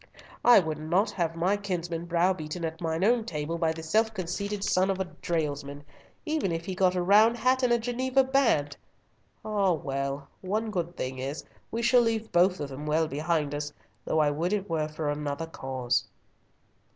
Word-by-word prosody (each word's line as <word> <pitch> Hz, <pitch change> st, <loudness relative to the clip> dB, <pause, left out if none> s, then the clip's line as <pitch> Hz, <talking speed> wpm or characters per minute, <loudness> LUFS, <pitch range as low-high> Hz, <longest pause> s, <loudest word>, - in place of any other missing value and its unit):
"I 245 Hz, -, +8 dB
would 160 Hz, -5 st, +1 dB
not 175 Hz, +7 st, +1 dB
have 165 Hz, -3 st, -1 dB
my 180 Hz, +4 st, +2 dB
kinsman 175 Hz, -4 st, -3 dB
browbeaten 170 Hz, -1 st, 0 dB
at 160 Hz, +1 st, -5 dB
mine 165 Hz, +1 st, -1 dB
own 235 Hz, +2 st, +3 dB
table 165 Hz, -4 st, -4 dB
by 165 Hz, -1 st, +2 dB
the 160 Hz, 0 st, -7 dB
self 220 Hz, +8 st, +2 dB
conceited 195 Hz, +2 st, -3 dB
son 185 Hz, 0 st, +2 dB
of 195 Hz, -1 st, 0 dB
a 190 Hz, -, 0 dB
dalesman, 145 Hz, -5 st, -3 dB, 0.4 s
even 305 Hz, -, 0 dB
if 165 Hz, 0 st, -3 dB
he -, -, -4 dB
have 185 Hz, -, -6 dB
got 185 Hz, -1 st, +3 dB
a 180 Hz, -, 0 dB
round 215 Hz, +5 st, +5 dB
hat 255 Hz, +3 st, +2 dB
and 240 Hz, -2 st, +2 dB
Geneva 260 Hz, +2 st, +2 dB
band! 240 Hz, -, +2 dB, 0.7 s
Ah, 200 Hz, -4 st, +2 dB
well! 140 Hz, -1 st, -3 dB
one 215 Hz, +4 st, -2 dB
good 175 Hz, -3 st, -3 dB
thing 130 Hz, 0 st, -4 dB
is 135 Hz, +4 st, -4 dB, 0.3 s
we 230 Hz, +1 st, -3 dB
shall 245 Hz, +1 st, +5 dB
leave 225 Hz, -1 st, -1 dB
both 180 Hz, +2 st, +3 dB
of 145 Hz, -2 st, -4 dB
them 140 Hz, +3 st, -7 dB
well 160 Hz, +1 st, +2 dB
behind 150 Hz, 0 st, -1 dB
us, 145 Hz, 0 st, -3 dB, 0.3 s
though -, -, -1 dB
I 150 Hz, -2 st, +4 dB
would 170 Hz, +6 st, -1 dB
it 205 Hz, -1 st, -1 dB
were 155 Hz, -2 st, -1 dB
for 155 Hz, 0 st, -4 dB
another 145 Hz, +1 st, -3 dB
cause." 130 Hz, -6 st, -2 dB
170 Hz, 190 wpm, -28 LUFS, 150-205 Hz, 0.7 s, I